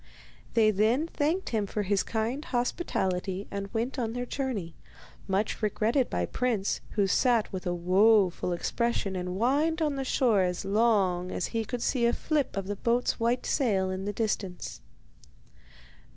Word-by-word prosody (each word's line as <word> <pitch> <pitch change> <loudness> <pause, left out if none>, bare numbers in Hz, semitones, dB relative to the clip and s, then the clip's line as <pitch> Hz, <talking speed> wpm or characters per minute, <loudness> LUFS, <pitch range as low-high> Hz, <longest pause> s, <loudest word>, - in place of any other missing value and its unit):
They 220 -2 +5
then 220 +9 +2
thanked 330 +3 -1
him 215 -3 0
for 210 +1 -2
his 200 0 +1
kind 235 +6 -2
hospitality 195 - -1
and 200 0 -4
went 240 +5 -2
on 225 -2 -1
their 245 0 -3
journey, 240 -11 -3 0.5
much 195 +2 -1
regretted 225 +5 +1
by 90 - -1
Prince, 225 - -1
who 205 -2 +2
sat 230 +2 +2
with 185 0 -4
a 175 - +1
woeful 185 +1 +3
expression 200 +2 -1
and 180 0 -3
whined 290 +8 +2
on 300 -3 0
the 270 - -1
shore 240 -6 +2
as 180 0 -1
long 195 -4 +2
as - - -2
he 225 -1 0
could 240 +2 -4
see 240 -3 +2
a 235 - +2
flip 300 -8 -1
of 195 - -2
the 205 +1 -4
boat's 240 +4 0
white 235 +2 +1
sail 195 -9 +1
in 190 +1 -4
the 205 - -2
distance. 205 -4 -3
220 Hz, 165 wpm, -28 LUFS, 190-245 Hz, 0.5 s, They